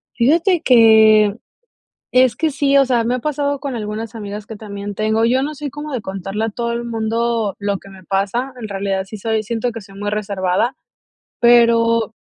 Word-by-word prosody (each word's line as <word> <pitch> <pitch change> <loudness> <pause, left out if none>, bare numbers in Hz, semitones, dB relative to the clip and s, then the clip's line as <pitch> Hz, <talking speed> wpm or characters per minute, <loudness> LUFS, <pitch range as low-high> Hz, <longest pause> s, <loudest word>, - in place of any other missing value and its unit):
Fíjate 330 - +2
que, 220 -4 +5 0.7
es 255 -1 +4
que 320 0 0
sí, 280 -1 +1
o 275 - +6
sea, 245 -3 +1
me 240 +2 0
ha 255 - -1
pasado 285 0 -2
con 275 -4 -4
algunas 220 +1 -5
amigas 205 -1 -7
que 220 - -8
también 200 -1 -7
tengo. 220 +1 +1
Yo 255 +3 +2
no 300 +2 -4
soy 290 0 -6
como 295 +2 -7
de 245 -5 -3
contarle 195 +3 -4
a - - 0
todo 235 +2 -3
el 235 0 -3
mundo 230 -2 -1
lo 200 -1 -1
que - - -16
me 190 -1 -14
pasa, 200 +8 -2
en 220 - -5
realidad 195 -1 -2
sí 195 +3 -9
soy 220 +1 -2
siento 230 +2 -2
que 230 -1 -7
soy 195 0 -15
muy 205 +1 -3
reservada, 200 +2 -1 0.7
pero 230 -2 +4
225 Hz, 195 wpm, -18 LUFS, 205-245 Hz, 0.7 s, o